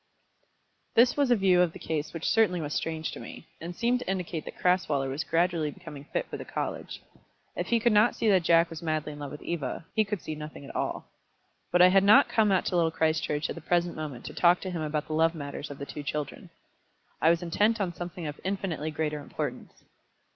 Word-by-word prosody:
This 240 +2 +5
was 285 -3 +2
a 245 - +6
view 190 -4 +4
of 175 -2 +2
the - - -8
case 155 -1 -3
which 165 -1 -6
certainly 215 -6 +3
was 150 -2 -4
strange 160 -1 -2
to - - -8
me, - - -10 0.2
and 175 +2 -6
seemed 240 +4 +1
to 250 - -6
indicate 180 -4 -3
that - - -9
Crasweller 160 -7 +1
was 135 +4 -2
gradually 165 -2 +1
becoming 150 -4 -10
fit - - -2
for - - -6
the - - -7
college. - - -5 0.5
If - - -3
he 235 - +3
could 235 0 +3
not 210 +3 +5
see 225 - -1
that 190 -3 +5
Jack 165 0 +4
was 160 - -7
madly 155 -2 -2
in 145 - -10
love 145 -1 -5
with 150 - -9
Eva, 160 -2 -4
he 220 - +4
could 205 -1 -3
see 155 - -5
nothing 150 -1 -8
at - - -10
all. - - -2 0.7
But 175 0 +6
I 180 - +8
had 195 +1 +5
not 205 +2 +7
come 215 -2 +3
out 190 - +2
to - - -1
Little 170 -2 +3
Christchurch 155 -2 0
at - - -4
the - - -9
present 175 0 0
moment 145 -6 -6
to - - -6
talk 175 0 +4
to 185 - -4
him 170 -3 -3
about 150 -1 -2
the 155 - -5
love 165 +2 +3
matters 145 0 -6
of 145 - -8
the 140 - -6
two 150 - -7
children. 145 0 -5 0.7
I 160 - +5
was 170 +1 +2
intent 210 +7 +2
on 185 -4 -1
something 175 -1 -6
of 150 -1 -5
infinitely 185 -5 -2
greater 150 -1 -2
importance. 145 - -6
165 Hz, 235 wpm, -28 LUFS, 150-185 Hz, 0.7 s, I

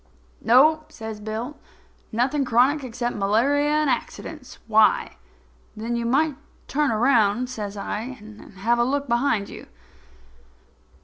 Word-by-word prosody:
"No," 310 +7 +4
says 220 -7 -8
Bill, 220 +7 -5 0.5
"nothing 260 +5 +1
chronic 260 +4 +2
except 240 -1 -3
malaria 240 +9 +2
and 305 0 +2
accidents. - - -4
Why?" 220 -1 +3 0.6
"Then 230 +2 -3
you 235 0 -2
might 285 +3 +1 0.3
turn 295 0 +1
around," 235 0 +2
says 210 -4 -5
I, 230 +6 -5
"and 210 0 -13
have 235 +5 +1
a - - +4
took 285 0 -1
behind 235 -4 +1
you." - - -11
240 Hz, 125 wpm, -23 LUFS, 220-280 Hz, 0.6 s, No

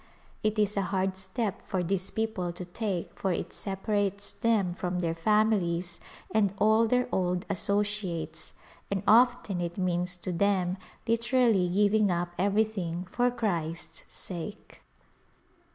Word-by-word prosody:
It 215 0 0
is 210 -1 +2
a - - +3
hard 190 0 0
step 190 +2 -3
for 185 -2 -2
these 185 +1 -1
people 220 -6 -2
to 180 - -7
take 185 -1 -3
for 190 - 0
it - - -3
separates 200 0 -1
them 210 -6 +1
from 180 0 -3
their 170 -2 0
families 180 -2 +1 0.3
and 200 -3 +2
all 220 +2 +4
their 250 +2 +2
old 180 -1 0
associates, 200 -3 -2 0.4
and 195 -1 -1
often 230 -5 +4
it 170 0 -4
means 180 -1 0
to 180 +1 -4
them 185 0 +1 0.3
literally 230 -5 +3
giving 205 +2 +3
up 175 0 -1
everything 195 -3 0
for 245 0 +2
Christ's 175 -9 -2
sake. 185 +4 -8
195 Hz, 135 wpm, -29 LUFS, 180-215 Hz, 0.4 s, all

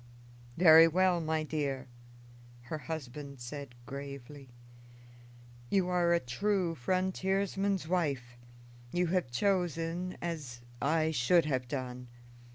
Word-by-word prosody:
"Very 165 -1 +9
well, 180 +1 +2
my 160 0 0
dear," 140 -4 -2 0.8
her 155 +5 -5
husband 140 -3 -6
said 125 +1 -7
gravely. 140 0 -8 1.2
"You 190 -2 +2
are 175 -1 +2
a 170 - +4
true 180 +7 0
frontiersman's 190 +4 0
wife; 140 -9 -1 0.6
you 180 0 +1
have 180 -9 +1
chosen 175 +3 -1
as 150 -8 -5 0.2
I 160 +2 +2
should 160 +5 +3
have 130 -4 -1
done. 125 -1 -5
160 Hz, 105 wpm, -32 LUFS, 135-180 Hz, 1.2 s, Very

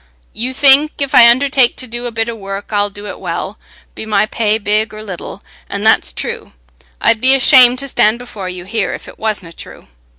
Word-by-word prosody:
You 245 +3 -3
think, 280 +3 +5
if 280 -1 -3
I 235 -1 +8
undertake 260 0 +2
to 255 - -7
do 240 0 -6
a - - -6
bit 225 0 -3
o' 235 - -4
work, 200 -1 -8
I'll 205 0 0
do 205 +1 -11
it 205 - -8
well, - - -6 0.3
be - - -8
my 215 -1 0
pay 215 0 -1
big 215 +1 -1
or 215 - -9
little—and 185 -5 -9
that's - - +3
true. - - -6 0.5
I'd 225 - +2
be 260 +1 +6
ashamed 255 -2 +5
to 275 +2 -3
stand 220 -3 +1
before 215 -6 -8
you 180 -1 -8
here 210 +1 -3
if - - -12
it - - -14
wasna 205 -6 -4
true. - - -12
225 Hz, 205 wpm, -14 LUFS, 205-255 Hz, 0.5 s, I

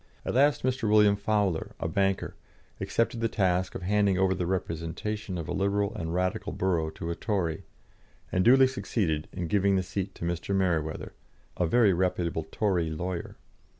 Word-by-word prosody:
At - - -2
last 140 +3 +3
Mr. 125 -3 0
William 105 -1 +5
Fowler, 100 -4 0
a - - -2
banker, 95 +3 0 0.5
accepted 115 0 0
the 115 - +2
task 95 -3 0
of - - -5
handing 100 0 +2
over 95 0 +3
the 90 -2 -2
representation 95 +3 -3
of 85 - -5
a - - -3
Liberal 100 +1 0
and 85 -7 -4
Radical 95 +4 -1
borough 85 -4 0
to 85 +1 -5
a - - -2
Tory, 85 -7 -2 0.7
and 90 - +2
duly 130 +4 +7
succeeded 95 -11 -1
in 90 -2 -4
giving 100 +3 +2
the 95 - +1
seat 95 +1 -4
to - - -5
Mr. 85 +3 -2
Mereweather, 85 -5 -1 0.4
a 90 - +1
very 110 0 +4
reputable 85 -3 -1
Tory 90 -6 0
lawyer. 85 +3 -4
95 Hz, 170 wpm, -28 LUFS, 85-105 Hz, 0.7 s, duly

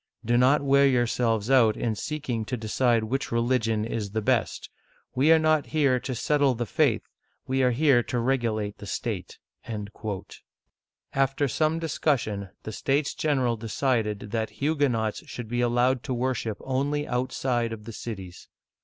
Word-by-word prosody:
Do 120 +2 +2
not 130 +4 +4
wear 140 0 +5
yourselves 120 -3 +1
out 115 -5 +5
in 115 - -1
seeking 125 -1 -3
to 125 - -3
decide 115 +1 +1
which 130 +5 -2
religion 115 -2 +1
is 110 -3 -3
the 110 - 0
best. - - 0 0.5
We 145 +5 +4
are 165 - +8
not 155 -1 +2
here 140 -5 +2
to 130 +1 -4
settle 145 +1 +2
the 120 +1 -2
faith, 100 - +1 0.4
we 130 +1 0
are 125 - +4
here 130 0 +4
to 120 - -3
regulate 115 -4 -1
the 100 - -9
state." - - -4 1.8
After 135 +1 +1
some 155 +5 +1
discussion 130 - -1
the 110 - -5
States 140 +6 0
General 130 -6 +1
decided 110 -2 -1
that 110 -1 -1
Huguenots 135 -8 0
should 120 -2 -7
be 120 +2 -1
allowed 120 +1 +2
to 130 - -2
worship 120 -4 -1
only 145 +3 -1
outside 125 -1 -1
of 110 -2 -7
the 115 - -7
cities. 95 -6 -8
125 Hz, 155 wpm, -26 LUFS, 115-135 Hz, 1.8 s, are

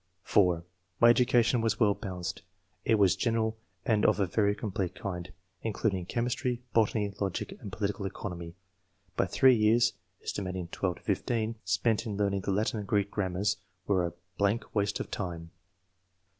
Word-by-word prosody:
(4) 90 -5 +3 0.4
''My 120 0 +8
education 120 0 +3
was 110 -2 0
well 105 -3 +5
balanced; 90 -4 -5 0.4
it 115 - +3
was 95 -4 +4
general 110 +1 0 0.3
and 110 -2 +2
of 105 - +4
a 100 - +3
very 100 +3 +2
complete 95 -4 -3
kind, 90 -2 -5 0.3
in 110 - -2
cluding 95 -4 -1
chemistry, 120 +2 -1
botany, 105 -2 +2
logic 95 -3 -2
and 100 - -7
political 100 0 -2
economy; 85 -3 -6 0.6
but - - +1
3 130 -1 +6
years 115 +2 +4 0.3
(aet. 90 -3 -3
12 90 -3 -1
15) 110 +3 -1
spent 110 +4 +1
in 105 -2 -3
learning 100 -1 +1
the 100 - -1
Latin 105 +2 0
and 100 - -6
Greek, 100 -1 +1
grammars 100 +1 0 0.3
were 95 -3 +2
a 85 - -2 0.3
blank 100 +3 +1
waste 100 -1 0
of - - -5
time." 85 -4 -4
100 Hz, 155 wpm, -30 LUFS, 95-110 Hz, 0.6 s, My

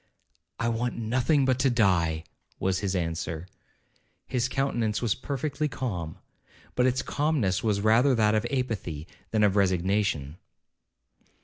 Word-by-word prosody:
'I 115 - +1
want 120 +1 -1
nothing 130 +5 +2
but 130 -1 +2
to 135 +1 +3
die,' 85 -9 +2 0.4
was 95 -1 +1
his 100 -2 -1
answer. 85 -1 -3 0.8
His 125 0 -1
countenance 120 -6 0
was 115 -5 +1
perfectly 140 +3 -2
calm, 90 - -4 0.6
but 125 0 +3
its 130 0 +1
calmness 140 -12 0
was 105 -3 +1
rather 120 +5 +4
that 110 -2 +3
of 110 +2 +1
apathy 110 - -2 0.2
than 110 -1 +2
of 100 -2 +3
resignation. 95 -5 +1
110 Hz, 130 wpm, -27 LUFS, 95-125 Hz, 0.8 s, rather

